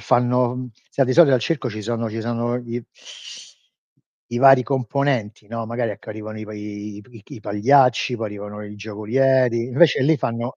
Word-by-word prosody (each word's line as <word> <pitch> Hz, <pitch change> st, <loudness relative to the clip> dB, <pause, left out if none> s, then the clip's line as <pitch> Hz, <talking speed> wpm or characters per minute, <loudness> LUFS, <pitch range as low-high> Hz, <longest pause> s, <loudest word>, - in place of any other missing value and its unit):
fanno, 125 Hz, 0 st, +2 dB
mhmm, 125 Hz, -1 st, -6 dB, 0.2 s
sai 135 Hz, -, +2 dB
di 130 Hz, -, +1 dB
solito 155 Hz, -4 st, +6 dB
al 120 Hz, -, -2 dB
circo 140 Hz, -6 st, -2 dB
ci 110 Hz, 0 st, -6 dB
sono 115 Hz, 0 st, -3 dB
ci 115 Hz, -, -4 dB
sono 120 Hz, +1 st, -2 dB
gli 120 Hz, 0 st, -6 dB, 1.5 s
i 120 Hz, -, -2 dB
vari 135 Hz, -1 st, +7 dB
componenti, 125 Hz, -5 st, -1 dB
non 115 Hz, 0 st, -5 dB
magari 120 Hz, -1 st, -2 dB
ecco 100 Hz, -, -10 dB
arrivano 110 Hz, 0 st, -7 dB
i 110 Hz, -, -6 dB
pa 110 Hz, -, -10 dB
i 105 Hz, 0 st, -7 dB
p 105 Hz, -, -22 dB
i 110 Hz, -4 st, -13 dB
chi -, -, -12 dB
i 110 Hz, -, -11 dB
pagliacci, 125 Hz, +4 st, +3 dB
poi 115 Hz, -1 st, -3 dB
arrivano 105 Hz, 0 st, -8 dB
i 105 Hz, 0 st, -9 dB
giocolieri, 115 Hz, +4 st, +1 dB
invece 140 Hz, +5 st, +4 dB
lì 155 Hz, +3 st, +3 dB
fanno 120 Hz, 0 st, -3 dB
115 Hz, 195 wpm, -21 LUFS, 105-130 Hz, 1.5 s, vari